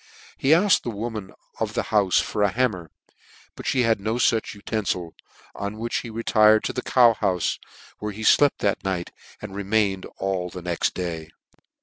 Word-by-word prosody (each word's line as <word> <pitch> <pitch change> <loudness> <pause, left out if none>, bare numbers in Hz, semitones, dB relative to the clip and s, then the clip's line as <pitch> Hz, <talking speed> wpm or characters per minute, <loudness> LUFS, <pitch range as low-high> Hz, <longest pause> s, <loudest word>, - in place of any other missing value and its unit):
He 135 - -1
afked 180 +6 +5
the - - -4
woman 110 -2 -5 0.3
of - - -2
the - - 0
houfe. 100 -3 +3
tor 105 - -1
a 100 - +4
hammer, 100 -7 -1 0.7
but - - -8
fhe 130 -2 +2
had 115 -2 +2
no 110 +3 -1
fuch 115 -3 +1
uten 110 +1 -3
fil 90 -3 -3 0.4
i - - -5
on 100 +2 -5
which 115 +1 -2
he 120 - -5
retired 110 -1 +4
to - - -2
the 125 - -2
cow 120 -3 +5
houfe, 90 -2 0 0.4
where 105 0 -4
he 110 +2 -8
flept 145 +6 +4
that 100 -1 0
night, 95 -3 -3 0.3
and 100 -2 -7
remained 100 -1 0
all 95 -2 -2
the 90 0 -9
next 85 -1 -1
day. 85 -3 -4
105 Hz, 190 wpm, -24 LUFS, 95-115 Hz, 0.7 s, afked